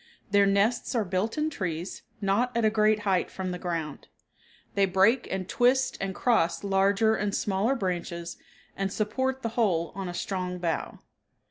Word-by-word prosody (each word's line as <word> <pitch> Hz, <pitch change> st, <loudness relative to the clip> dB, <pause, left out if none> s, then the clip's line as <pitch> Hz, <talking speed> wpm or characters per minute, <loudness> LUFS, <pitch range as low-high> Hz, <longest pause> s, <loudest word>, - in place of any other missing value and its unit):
Their 200 Hz, -1 st, +5 dB
nests 210 Hz, +6 st, +1 dB
are 225 Hz, -3 st, +1 dB
built 190 Hz, +7 st, -1 dB
in 305 Hz, +1 st, 0 dB
trees, 180 Hz, -, -4 dB, 0.2 s
not 230 Hz, +5 st, +1 dB
at 230 Hz, -, +2 dB
a 215 Hz, -, +4 dB
great 215 Hz, 0 st, +3 dB
height 190 Hz, -3 st, +1 dB
from 185 Hz, -1 st, -4 dB
the 180 Hz, -, -5 dB
ground. 165 Hz, -5 st, -4 dB, 0.7 s
They 200 Hz, -1 st, +3 dB
break 195 Hz, +7 st, +3 dB
and 190 Hz, -1 st, -3 dB
twist 255 Hz, +4 st, +2 dB
and 195 Hz, -1 st, -3 dB
cross 210 Hz, -8 st, +1 dB
larger 200 Hz, +2 st, +3 dB
and 205 Hz, -2 st, -1 dB
smaller 210 Hz, +6 st, +1 dB
branches 175 Hz, -4 st, -3 dB, 0.4 s
and 195 Hz, 0 st, -2 dB
support 260 Hz, +6 st, -1 dB
the 230 Hz, -, 0 dB
whole 195 Hz, -8 st, +1 dB
on 195 Hz, -1 st, -5 dB
a 175 Hz, -, -6 dB
strong 185 Hz, -1 st, -3 dB
bough. 170 Hz, -2 st, -2 dB
195 Hz, 165 wpm, -27 LUFS, 185-225 Hz, 0.7 s, Their